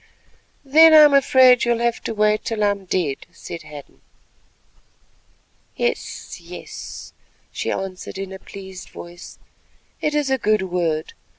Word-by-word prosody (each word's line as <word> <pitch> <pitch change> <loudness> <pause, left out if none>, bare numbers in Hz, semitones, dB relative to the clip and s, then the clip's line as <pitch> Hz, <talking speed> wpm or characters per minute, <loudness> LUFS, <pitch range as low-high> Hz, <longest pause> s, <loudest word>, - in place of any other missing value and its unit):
"Then 315 +3 +7
I 310 - +10
am 295 -1 +6
afraid 260 -2 +5
you 240 - +2
will - - -2
have 235 -1 0
to 225 - -3
wait 210 0 +2
till 220 -2 -2
I 205 - +4
am 200 -1 -6
dead," 170 -7 -1
said 170 0 -9
Hadden. 150 -2 -13 1.7
"Yes, 480 - -4
yes," - - -9 0.4
she - - -4
answered 190 0 -5
in 195 0 -6
a 190 - -9
pleased 190 -2 -11
voice, 175 0 -11 0.6
"it 300 0 -1
is 290 -2 0
a 265 - +1
good 215 -3 +1
word. 170 -4 -2
205 Hz, 150 wpm, -21 LUFS, 180-260 Hz, 1.7 s, I